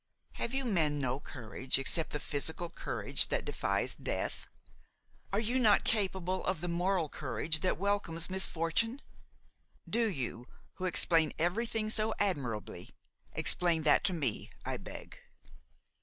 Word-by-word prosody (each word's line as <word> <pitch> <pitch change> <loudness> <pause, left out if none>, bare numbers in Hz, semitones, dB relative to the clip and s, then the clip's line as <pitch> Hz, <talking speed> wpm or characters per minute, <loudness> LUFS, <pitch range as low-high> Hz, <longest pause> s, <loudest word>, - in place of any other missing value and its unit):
Have 235 - -4
you 270 -1 0
men 160 -10 +1
no 130 -1 -1
courage 130 -2 -2
except 155 +4 +2
the 150 - -3
physical 160 +4 -2
courage - - +4
that - - -1
defies - - 0
death? - - -3 0.8
are 200 - +1
you 235 +4 +1
not 220 -4 +5
capable 190 -3 0
of 185 -3 -1
the 175 - -3
moral 175 0 0
courage 145 +3 0
that 185 - 0
welcomes 195 -5 -1
misfortune? 190 - 0 0.8
Do 230 -1 +1
you, 125 - -3 0.3
who 185 - -3
explain 165 -3 +2
everything 215 +5 0
so 215 0 +1
admirably, 135 - -2 0.4
explain 170 -3 +1
that 150 - +4
to 190 - +2
me, 140 -10 -2 0.2
I - - -2
beg. - - -10
175 Hz, 135 wpm, -32 LUFS, 150-205 Hz, 0.8 s, not